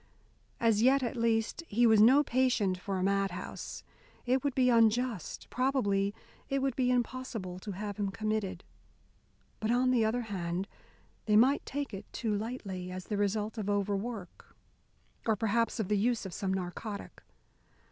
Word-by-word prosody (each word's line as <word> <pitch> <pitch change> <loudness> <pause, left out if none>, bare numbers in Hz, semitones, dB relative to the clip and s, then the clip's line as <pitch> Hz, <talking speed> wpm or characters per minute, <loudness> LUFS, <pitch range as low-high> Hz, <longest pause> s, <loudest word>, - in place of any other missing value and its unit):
As 225 -2 +3
yet, 265 +3 +4
at 240 - -2
least, 230 +4 0
he 235 +4 +3
was 220 -2 +6
no 265 +7 +7
patient 245 -8 +2
for 195 +1 -3
a 185 - -1
mad 195 0 +2
house: 180 - -7 0.4
it 255 +1 +2
would 285 -3 -1
be 255 -1 +4
unjust, 230 -4 +2
probably 210 -7 +1 0.4
it 275 - +1
would 270 -2 0
be 255 -2 +1
impossible 240 -7 -2
to 200 +1 -6
have 205 +1 -5
him 205 -2 -1
committed. 200 -2 -2 1.0
But 220 - -2
on 250 +2 +3
the 240 -3 +3
other 225 +3 +1
hand 185 -4 -3 0.6
they 210 - +4
might 260 +6 +5
take 285 -3 -3
it 195 +1 -8
too 225 -3 -2
lightly, 200 -4 -4
as 185 0 -6
the 210 - -2
result 210 +2 -1
of 205 -1 -2
overwork, 205 0 -3 0.7
or 220 - +4
perhaps 230 +3 0
of 215 - 0
the 210 0 +1
use 235 0 +1
of 190 - -6
some 190 +2 -2
narcotic. 190 +3 -5
220 Hz, 165 wpm, -31 LUFS, 195-245 Hz, 1.0 s, no